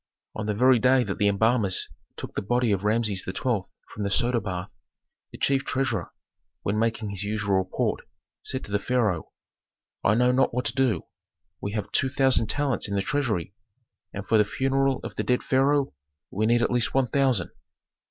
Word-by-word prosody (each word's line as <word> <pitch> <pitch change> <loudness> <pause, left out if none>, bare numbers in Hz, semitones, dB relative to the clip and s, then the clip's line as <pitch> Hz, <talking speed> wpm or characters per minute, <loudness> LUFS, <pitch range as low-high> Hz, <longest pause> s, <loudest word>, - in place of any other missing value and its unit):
On 110 -1 -4
the 105 - 0
very 125 +2 +5
day 130 +1 +4
that 100 -4 -4
the 105 - +3
embalmers 105 -1 +2 0.3
took - - -7
the - - -2
body 120 +2 +1
of 100 -1 0
Rameses 105 -2 +1
XII. 95 - -6 0.5
from 105 - -9
the 100 - 0
soda 120 +3 +1
bath, 95 -2 -5 0.6
the - - -10
chief 135 0 +1
treasurer, 120 -10 -2 0.5
when 105 +2 0
making 110 -2 -1
his 100 0 -4
usual 105 -2 0
report, 95 0 -1 0.4
said 130 - -4
to - - -10
the 100 - +1
pharaoh, 110 -7 0 0.7
"I 105 - +4
know 125 +2 +4
not 130 -1 +2
what 125 0 -1
to 115 - 0
do. 125 -10 +1 0.6
We 100 - -4
have 105 -2 -3
two 130 - +2
thousand 130 -4 +3
talents 140 -3 0
in 100 - -3
the 100 - 0
treasury, 110 - -1 0.6
and 100 0 -7
for 110 - +4
the - - +6
funeral 135 +4 0
of - - -7
the - - 0
dead 125 0 +1
pharaoh 140 +1 +2 0.4
we 110 +3 0
need 120 +1 +3
at - - 0
least 125 0 0
one 135 -1 +4
thousand." 130 -7 +1
115 Hz, 190 wpm, -26 LUFS, 100-130 Hz, 0.7 s, the